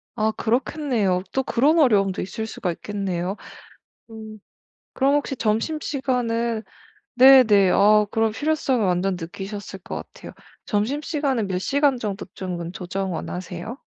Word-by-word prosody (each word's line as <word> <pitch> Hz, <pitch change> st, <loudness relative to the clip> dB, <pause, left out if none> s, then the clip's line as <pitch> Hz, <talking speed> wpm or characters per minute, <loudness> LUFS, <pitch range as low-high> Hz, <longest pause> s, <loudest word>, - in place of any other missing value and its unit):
아. 220 Hz, -1 st, +1 dB
그렇겠네요. 230 Hz, -6 st, 0 dB
또 265 Hz, -, 0 dB
그런 295 Hz, +9 st, +2 dB
어려움도 200 Hz, -9 st, +3 dB
있을 220 Hz, +4 st, -5 dB
수가 180 Hz, -4 st, -3 dB
있겠네요. 190 Hz, 0 st, -3 dB, 0.7 s
음. 220 Hz, -1 st, -10 dB, 0.5 s
그럼 275 Hz, +2 st, +2 dB
혹시 285 Hz, -2 st, -1 dB
점심시간은 235 Hz, -2 st, -1 dB, 0.5 s
네네 245 Hz, -7 st, +7 dB
아 210 Hz, +1 st, +5 dB
그런 225 Hz, -1 st, +1 dB
필요성을 280 Hz, -3 st, 0 dB
완전 185 Hz, +1 st, +1 dB
느끼셨을 195 Hz, +3 st, -7 dB
것 -, -, -7 dB, 0.2 s
같아요. -, -, -11 dB, 0.3 s
점심시간은 265 Hz, +1 st, -1 dB
몇 185 Hz, -1 st, -2 dB
시간 280 Hz, +4 st, +2 dB
정도쯤은 185 Hz, -4 st, -5 dB
조정 190 Hz, 0 st, -4 dB
원하세요? 180 Hz, +7 st, -6 dB
215 Hz, 295 characters per minute, -23 LUFS, 195-260 Hz, 0.7 s, 네네